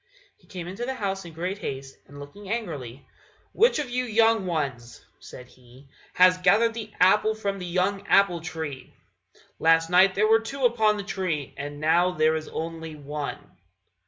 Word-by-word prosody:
He - - -28
came 180 -3 -7
into 195 +6 -6
the 265 +2 -3
house 195 -5 -3
in 170 - -10
great 180 +5 -4
haste, 135 -6 -6
and 145 0 -13
looking 190 +8 -11
angrily, 145 - -5 0.5
"Which 470 +3 +3
of 285 -5 -3
you 250 +1 0
young 225 -3 +2
ones," 135 -8 -4
said 125 - -12
he, 130 +2 -19 0.3
"has 185 0 +5
gathered 205 +5 +3
the 220 -2 -7
apple 210 +4 +4
from 200 -2 -3
the 180 - -6
young 195 +3 -1
apple 190 -4 +3
tree? 160 -6 -7 0.6
Last 165 +1 +3
night 190 +2 +5
there 215 +2 +3
were 225 +1 +5
two 260 +4 -3
upon 220 -3 +3
the 200 - -4
tree, 185 -8 -3
and 145 +1 -7
now 170 +4 +2
there 155 -1 +2
is 155 0 -4
only 165 -1 -6
one." 145 0 -6
180 Hz, 175 wpm, -25 LUFS, 155-210 Hz, 0.6 s, has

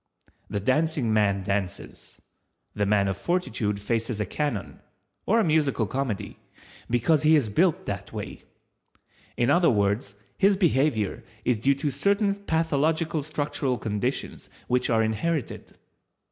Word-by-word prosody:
The 100 - -2
Dancing 130 +1 +1
man 100 -2 +2
dances, 100 -2 -4 0.5
the 105 -1 0
man 100 -1 +3
of 95 - -1
Fortitude 110 - -1
faces 115 +1 -2
a 105 - 0
cannon—or 150 - -3
a - - +3
musical 150 - +2
comedy—because 120 - -2
he 155 +1 +5
is 135 -8 +2
built 165 - +2
that - - -5
way. - - -7 1.0
In 120 - +2
other 175 -1 +4
words, 100 -1 0 0.2
his 195 0 +4
behavior 135 - +1 0.2
is 120 -4 +2
due 140 +5 +3
to 145 +1 -2
certain 200 - +1
pathological 160 -4 0
structural 145 -3 -2
conditions 110 +5 -3 0.2
which 125 0 +1
are 110 -2 +3
inherited. 120 +7 -3
130 Hz, 125 wpm, -26 LUFS, 105-160 Hz, 1.0 s, he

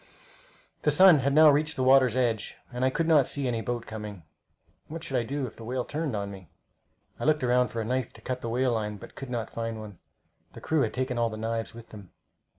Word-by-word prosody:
The - - +2
sun 185 -5 +7
had 140 +2 +1
now 155 +1 +7
reached 155 +2 +1
the 130 - -1
water's 130 -2 +5
edge, 120 -4 0 0.2
and 125 +1 -2
I 130 - +4
could 165 +5 -1
not 155 -5 +5
see 140 -2 -2
any 115 -2 -1
boat 120 0 -3
coming. 105 -5 -7 0.6
What 165 +1 -7
should 135 - -4
I 125 - +3
do 135 +4 -3
if 120 - -9
the 115 - -10
whale 125 +2 -3
turned 150 -5 -3
on 100 -1 -3
me? 95 -5 -11 0.7
I - - -5
looked 155 -1 +2
round 125 -1 +3
for 115 - -4
a - - -3
knife 125 0 -1
to 115 - -16
cut 125 +2 -4
the 115 - -4
whale 125 +2 +1
line, 105 -2 -2
but - - -12
could 135 -1 -8
not 120 -3 -3
find 115 -1 -4
one. 105 -4 -10 0.5
The - - -10
crew 160 -2 +1
had - - -1
taken 130 -1 -1
all 115 -1 +2
the 110 - -7
knives 115 +1 -3
with 115 -1 -12
them. 100 -4 -12
125 Hz, 245 wpm, -27 LUFS, 110-135 Hz, 0.7 s, sun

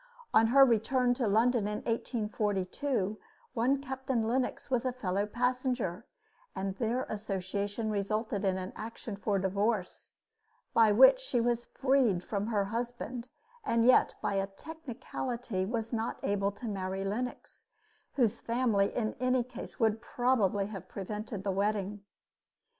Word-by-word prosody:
On 225 +1 +6
her 270 +3 +7
return 245 +1 +2
to 245 -2 -1
London 225 +1 +3
in 210 0 -3
1842, 210 -1 -1 0.3
one 255 +4 +2
Captain 265 -4 -1
Lennox 255 +2 -1
was 250 -2 +2
a 255 - 0
fellow 205 -4 -1
passenger; 245 -5 -1 0.5
and 190 0 -2
their 240 +2 0
association 205 +1 -3
resulted 210 +1 -1
in 190 -1 +1
an 185 0 -5
action 225 -1 -6
for 200 0 0
divorce, 195 +1 -1 0.6
by 225 -2 +6
which 265 - +8
she - - -1
was 240 0 +1
freed 260 -9 +2
from 205 +1 -2
her 210 -3 +1
husband, 240 +2 -4 0.4
and 230 - +2
yet 255 - +5
by - - 0
a 195 0 0
technicality 245 -4 -5
was 230 +1 -3
not 225 0 -1
able 200 0 +1
to 205 +4 -8
marry 195 -1 -3
Lennox, 240 +5 -4 0.5
whose 235 -6 +2
family 230 -4 +2
in 220 -3 0
any 255 0 +2
case 250 - -9
would 220 -1 +2
probably 225 -6 +1
have 195 -3 -8
prevented 210 +1 -5
the 200 - 0
wedding. 205 +1 -1
220 Hz, 140 wpm, -31 LUFS, 200-245 Hz, 0.6 s, which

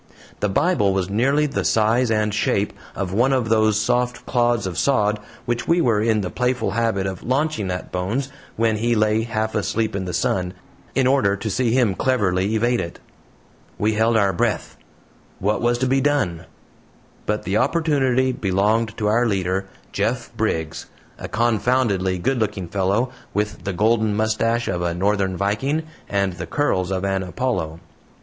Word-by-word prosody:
The 105 - 0
Bible 105 - +2
was 95 0 -1
nearly 135 +8 +2
the 145 -1 -2
size 115 +3 +2
and 105 -1 +1
shape 105 -1 0 0.2
of 95 -2 -3
one 120 +6 +3
of 125 -4 +1
those 110 -1 +3
soft 125 +2 0
clods 120 -2 +1
of 90 -3 -3
sod 105 -6 +2 0.3
which 120 0 -2
we 170 +1 +3
were 115 -9 +2
in 110 -1 +2
the 90 -3 -4
playful 125 -1 0
habit 115 -3 0
of 95 -2 -4
launching 130 -6 -1
at 90 0 -4
Bones 110 +10 -2 0.3
when 110 -1 +1
he 120 +2 +1
lay 110 0 +2
half 110 -1 -2
asleep 110 0 -1
in 95 -1 -2
the 90 - -3
sun, 90 0 -1 0.4
in 135 - +3
order 130 -7 +3
to 110 +2 -4
see 125 +3 +1
him 120 -6 +3
cleverly 100 -3 +1
evade 120 +2 +2
it. 85 - -7 0.8
We 110 +1 +1
held 110 +1 +2
our 100 -3 +3
breath. 85 - -1 0.6
What 105 +3 0
was 120 0 +2
to 130 - 0
be 135 +1 +2
done? 130 - 0 0.8
But 105 0 -1
the 95 +3 0
opportunity 135 -4 +2
belonged 110 +2 0
to 105 - -2
our 115 +3 +3
leader, 95 -1 -1 0.2
Jeff - - -2
Briggs 80 0 -2 0.3
a - - -5
confoundedly 110 -4 +1
good 125 +7 0
looking 105 -4 -2
fellow, 100 +7 0 0.2
with 105 0 -2
the 100 - -1
golden 110 +2 +2
mustache 115 +2 +1
of 90 -2 -1
a 85 -1 -1
northern 95 0 0
viking 130 - 0 0.3
and 100 -2 0
the 90 -1 -6
curls 95 -11 0
of 95 0 -1
an 95 -1 0
Apollo. 90 -4 -2
110 Hz, 170 wpm, -22 LUFS, 95-120 Hz, 0.8 s, one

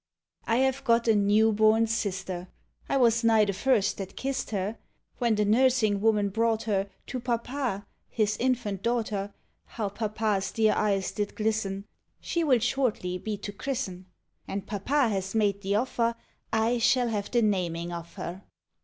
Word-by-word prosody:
I 230 - +2
have 265 +2 +1
got 235 -2 +3
a 225 - +6
new 210 +2 +4
born 220 +1 +4
sister; 190 -5 -3 0.4
I - - +2
was 235 -2 +3
nigh 225 -2 +5
the 200 - -1
first 215 0 +1
that 195 -1 -6
kissed 270 0 -2
her. 205 +1 -3 0.4
When 235 -2 +2
the 210 0 +1
nursing 220 -2 +3
woman 210 -2 +3
brought 225 +2 +1
her 200 -2 0 0.2
To 255 - -4
papa, 240 -3 -2 0.2
his 215 -2 0
infant 235 -6 -1
daughter, 215 -3 -1 0.3
How 215 -4 -4
papa's 210 -1 -1
dear 220 -1 +3
eyes 195 -2 +1
did 205 -1 -3
glisten! 210 -3 -1 0.2
— - - -53
She 340 - -1
will 270 -5 +4
shortly 225 -7 -1
be 210 +2 -4
to 205 +1 -6
christen; 200 -6 -4 0.4
And 195 0 -4
papa 245 +6 +1
has 195 -1 -3
made 200 -2 +1
the 200 +1 0
offer, 235 0 0 0.4
I 225 +2 +2
shall 245 +1 +3
have 205 -2 -2
the 240 -2 +2
namiug 175 -4 0
of 170 0 -7
her. 180 +3 -6
215 Hz, 165 wpm, -27 LUFS, 200-235 Hz, 0.4 s, a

